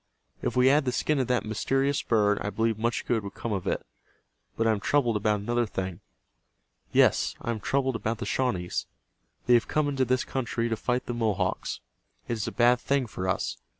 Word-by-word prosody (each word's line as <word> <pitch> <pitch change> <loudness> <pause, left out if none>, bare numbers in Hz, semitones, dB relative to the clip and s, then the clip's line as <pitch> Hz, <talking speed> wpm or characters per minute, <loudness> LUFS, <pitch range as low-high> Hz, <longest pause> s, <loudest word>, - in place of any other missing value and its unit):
"If - - -2
we 125 0 +4
had 140 +2 +5
the 125 - +1
skin 150 +3 0
of 130 - 0
that 125 -2 +1
mysterious 135 +6 0
bird 105 -3 +2
I 105 - -2
believe 110 0 0
much 115 -1 -1
good 115 -4 0
would 100 - -7
come 115 - -3
of 95 -3 -3
it. - - -1 0.7
But 115 - +1
I 115 - +4
am 110 - 0
troubled 120 +2 +2
about 105 0 +1
another 120 +2 0
thing. 95 -4 -4 0.9
Yes, - - +3
I 115 - -3
am 110 - -3
troubled 135 +3 0
about 115 0 -2
the 120 - -5
Shawnees. 95 -10 -1 0.6
They 125 - +4
have 120 -2 +4
come 150 -1 +1
into 135 -2 +1
this 130 +1 +1
country 120 -2 -2
to 115 - 0
fight 125 +3 -1
the 120 - -3
Mohawks. 105 -5 -1 0.5
It - - -1
is 110 -3 -3
a - - -2
bad 120 0 +4
thing 140 0 +1
for 95 -4 -5
us. 95 - -1
115 Hz, 210 wpm, -27 LUFS, 105-125 Hz, 0.9 s, had